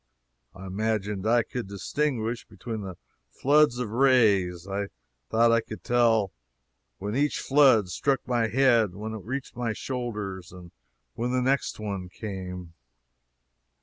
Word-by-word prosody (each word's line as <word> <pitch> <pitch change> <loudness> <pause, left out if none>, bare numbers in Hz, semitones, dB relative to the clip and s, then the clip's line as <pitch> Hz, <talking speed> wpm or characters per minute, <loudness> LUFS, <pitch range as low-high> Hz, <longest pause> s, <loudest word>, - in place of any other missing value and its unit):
I 95 0 -9
imagined 105 0 -2
I 120 +1 +4
could 125 -3 -5
distinguish 115 +3 -2
between 110 +2 -6
the 95 -3 -7 0.3
floods 145 -2 +3
of 125 -4 -3
rays 105 -9 +3
I 100 +1 -2 0.4
thought 115 +1 +4
I 115 0 +4
could 110 - -9
tell 115 -5 +3 0.7
when 105 +4 -4
each 145 +2 +1
flood 135 -8 +5
struck 135 +9 0
my 120 -3 +1
head, 115 -5 +3
when 110 +2 -5
it 110 - -6
reached 130 +3 -5
my 120 -2 -1
shoulders, 105 - -5
and 90 -1 -12 0.4
when 120 +1 -2
the 130 - +2
next 135 -2 0
one 100 -4 -4
came. 90 -4 -7
110 Hz, 140 wpm, -27 LUFS, 95-125 Hz, 0.7 s, flood